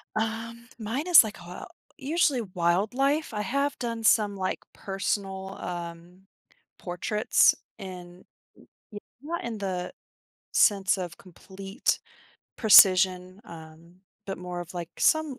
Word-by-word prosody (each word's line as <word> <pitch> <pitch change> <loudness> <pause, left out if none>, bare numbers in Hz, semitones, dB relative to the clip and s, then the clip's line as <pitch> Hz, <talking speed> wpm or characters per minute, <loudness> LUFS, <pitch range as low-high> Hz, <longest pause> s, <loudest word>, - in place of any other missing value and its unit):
Um, 225 +2 -4
mine 235 +9 -3
is 350 -7 +9
like 220 -1 -7
a 175 +1 -9 0.3
usually, 290 -2 +1
wildlife. 215 - 0
I 210 - -2
have 280 +7 -1
done 230 -2 -4
some, 210 -2 +3
like, 185 -1 -3
personal, 195 0 -4
um, 175 +2 -8 0.5
portraits, 185 +4 +2 0.2
and 180 -2 -10 0.3
w - - -20 0.3
w 205 - -7 0.2
not 335 +4 -5
in 230 -2 -4
the 180 -2 -4 0.6
sense 195 -2 +3
of 175 -2 -6
complete 195 - -4 0.6
precision, 185 -3 +5
um, 165 -1 -13 0.3
but 195 - -4
more 180 0 -6
of, 175 +1 -9
like, 170 -2 -5
some 315 -4 +2
195 Hz, 120 wpm, -26 LUFS, 180-230 Hz, 0.6 s, is